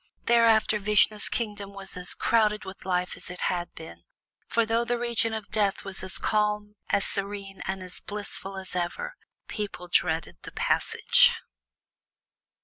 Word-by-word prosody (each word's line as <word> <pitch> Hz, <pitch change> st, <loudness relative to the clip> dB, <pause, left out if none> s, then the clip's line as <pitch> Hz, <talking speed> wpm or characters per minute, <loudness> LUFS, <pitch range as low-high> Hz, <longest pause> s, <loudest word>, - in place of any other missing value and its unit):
Thereafter 225 Hz, -2 st, +4 dB
Vishnu's 210 Hz, +1 st, +4 dB
kingdom 205 Hz, -3 st, -4 dB
was 195 Hz, -1 st, -8 dB
as 180 Hz, 0 st, -2 dB
crowded 215 Hz, -2 st, +2 dB
with 190 Hz, 0 st, -10 dB
life 180 Hz, -1 st, -1 dB
as -, -, -8 dB
it 180 Hz, -, -7 dB
had 175 Hz, -1 st, -1 dB
been, 85 Hz, -, -10 dB, 0.5 s
for 230 Hz, -1 st, +2 dB
though 225 Hz, +1 st, +1 dB
the 240 Hz, 0 st, -1 dB
region 235 Hz, -1 st, 0 dB
of 220 Hz, -2 st, -6 dB
Death 205 Hz, -2 st, +1 dB
was 195 Hz, -1 st, -4 dB
as 190 Hz, 0 st, +1 dB
calm, 210 Hz, -1 st, 0 dB
as 200 Hz, -, +2 dB
serene, 200 Hz, -1 st, -3 dB
and 190 Hz, -1 st, -3 dB
as 180 Hz, 0 st, -8 dB
blissful 205 Hz, -1 st, -5 dB
as 190 Hz, -1 st, -5 dB
ever, 330 Hz, -, -3 dB, 0.3 s
people 205 Hz, -4 st, -5 dB
dreaded 165 Hz, -2 st, 0 dB
the -, -, -10 dB
Passage. -, -, +4 dB
205 Hz, 150 wpm, -27 LUFS, 190-220 Hz, 0.5 s, Thereafter